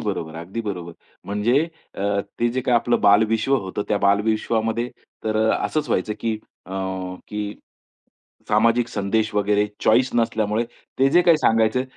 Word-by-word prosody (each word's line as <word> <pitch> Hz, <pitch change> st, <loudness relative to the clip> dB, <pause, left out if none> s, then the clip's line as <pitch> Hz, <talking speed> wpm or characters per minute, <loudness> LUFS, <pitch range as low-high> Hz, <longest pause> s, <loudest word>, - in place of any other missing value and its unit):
बरोबर, 85 Hz, -6 st, -3 dB
अगदी 90 Hz, +8 st, -5 dB
बरोबर. 90 Hz, -6 st, -5 dB, 0.3 s
म्हणजे 105 Hz, +7 st, +2 dB, 0.4 s
अ, 100 Hz, 0 st, 0 dB, 0.2 s
ते 120 Hz, -, +3 dB
जे 130 Hz, +2 st, -1 dB
काही 125 Hz, -1 st, +1 dB
आपलं 120 Hz, +1 st, +1 dB
बालविश्व 110 Hz, +5 st, +4 dB
होतं. 100 Hz, -1 st, -3 dB
त्या 105 Hz, -, +1 dB
बालविश्वामध्ये 110 Hz, +3 st, +1 dB, 0.4 s
तर 110 Hz, 0 st, 0 dB
असचं 155 Hz, -, 0 dB
व्हायचं 105 Hz, -1 st, 0 dB
की 110 Hz, -2 st, -1 dB, 0.3 s
अ, 90 Hz, -, -13 dB, 0.6 s
की, 105 Hz, -1 st, -4 dB, 0.9 s
सामाजिक 115 Hz, +2 st, +3 dB
संदेश 110 Hz, +1 st, -1 dB
वगैरे 105 Hz, 0 st, +2 dB, 0.2 s
चॉइस 125 Hz, +4 st, +4 dB
नसल्यामुळे 110 Hz, -1 st, +1 dB, 0.3 s
ते 135 Hz, +1 st, +5 dB
जे 175 Hz, +3 st, +6 dB
काही 170 Hz, -2 st, +5 dB
सांगायचे 115 Hz, -1 st, +3 dB
110 Hz, 140 wpm, -22 LUFS, 100-115 Hz, 0.9 s, जे